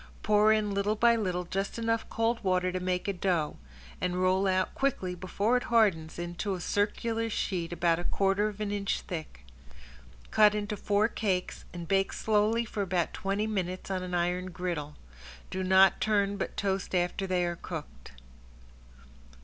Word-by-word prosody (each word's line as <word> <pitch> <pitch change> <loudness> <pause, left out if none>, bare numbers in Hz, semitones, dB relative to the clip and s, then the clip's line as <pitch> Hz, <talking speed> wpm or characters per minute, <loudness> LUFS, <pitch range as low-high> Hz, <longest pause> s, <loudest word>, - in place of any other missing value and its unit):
Pour 210 0 +5
in 215 -1 +2
little 200 +2 +1
by 235 +2 +4
little 180 -5 -1
just 195 +5 -3
enough 230 0 -1
cold 230 +1 0
water 185 -1 +1
to 185 - -2
make 180 +1 -1
a 200 - 0
dough 175 -5 0 0.4
and 180 0 -1
roll 185 +1 +2
out 185 0 +1
quickly 240 -10 -1
before 200 +6 0
it 245 - -3
hardens 195 -9 +2
into 175 +3 -3
a - - -6
circular 225 +4 -1
sheet 180 -5 -2
about 170 -1 +1
a - - -4
quarter 195 +3 +1
of 210 -1 -7
an 210 -1 -2
inch 200 -1 -1
thick. 155 - -7 0.9
Cut 210 -1 +5
into 210 0 -2
four 205 +2 +2
cakes 190 -6 -2
and 170 -1 -7
bake 195 +2 +1
slowly 220 +2 +2
for 215 -1 -4
about 180 -3 0
twenty 200 +2 -1
minutes 185 -3 -3
on 185 -1 -1
an 180 -1 -3
iron 180 +1 0
griddle. 170 -5 -4 0.6
Do 190 - -2
not 190 +1 +5
turn 205 -2 +2
but - - -4
toast 195 -1 -1
after 180 +2 0
they 180 -1 +1
are 175 0 -2
cooked. 160 - -8
195 Hz, 170 wpm, -29 LUFS, 180-210 Hz, 0.9 s, Pour